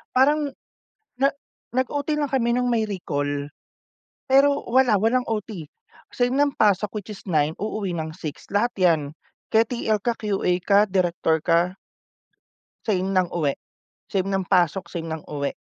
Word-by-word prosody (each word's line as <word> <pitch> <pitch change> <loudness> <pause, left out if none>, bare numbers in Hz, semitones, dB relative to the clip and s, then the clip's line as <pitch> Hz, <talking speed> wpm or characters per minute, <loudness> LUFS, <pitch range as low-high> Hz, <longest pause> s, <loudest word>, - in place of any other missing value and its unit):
Parang 290 +2 +4 0.7
na 275 +3 +2 0.4
nag 255 +1 +1
OT 290 +1 -2
lang 290 - 0
kami 240 -3 +1
nung 250 +1 +1
may 230 -2 +2
recall. 145 -8 -3 0.8
Pero 280 +2 +4
wala 245 -3 +4
walang 235 +5 +2
OT, 205 -7 -4 0.4
same 245 +1 0
ng 285 0 +2
pasok 210 -1 +3
which 210 +1 -9
is - - -13
9 155 -1 +2
uuwi 205 -4 -2
ng 160 -1 -3
6, 155 -6 -7
lahat 220 +5 +1
yan 170 -4 +4 0.5
ke 220 +1 +6
TL 220 -4 0
ka, 235 -1 0
QA 200 -4 0
ka, 200 0 +5
direktor 175 -3 +1
ka. 175 +2 +2 1.1
Same 190 -3 0
ng 180 -2 +1
uwi, 150 -5 0 0.5
same 190 -1 0
ng 195 -1 0
pasok, 180 -1 +2
same 165 -1 -5
ng 160 -1 -4
uwi. 140 -1 -2
200 Hz, 155 wpm, -24 LUFS, 170-245 Hz, 1.1 s, ke